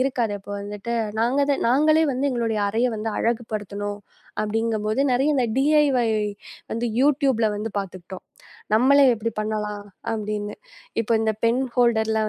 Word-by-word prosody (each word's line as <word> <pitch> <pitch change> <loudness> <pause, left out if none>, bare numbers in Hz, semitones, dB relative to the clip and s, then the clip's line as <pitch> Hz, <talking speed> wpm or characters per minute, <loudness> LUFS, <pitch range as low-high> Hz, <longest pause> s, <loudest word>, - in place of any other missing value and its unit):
இருக்காது. 250 -5 0
அப்போ 200 - -12
வந்துட்டு 210 +3 -5 0.3
நாங்க 245 +5 +1 0.3
நாங்களே 310 +5 +4
வந்து 270 +3 0
எங்களோட 230 -3 -1
அறைய 230 +4 +1
வந்து 220 +1 -3
அழகுபடுத்துனோம், 205 -3 -3 0.4
அப்பிடிங்கம்போது 215 +2 -1
நிறைய 275 +5 +2
இந்த 255 - +2
DIY 275 -4 +3 0.6
வந்து 235 +1 -1
YouTube 275 -3 +3
ல 215 - +4
வந்து 220 +2 -4
பாத்துக்கிட்டோம். 185 -1 -7 0.5
நம்மளே 275 +5 +5
எப்பிடி 230 +1 -3
பண்ணலாம் 210 -1 -3 0.3
அப்பிடின்னு. 210 -1 -3 0.5
இப்போ 230 - -1
இந்த 220 0 +1
பென் 235 +3 +2
ஹோல்டர்லாம் 220 -2 +2
225 Hz, 130 wpm, -23 LUFS, 210-255 Hz, 0.6 s, நம்மளே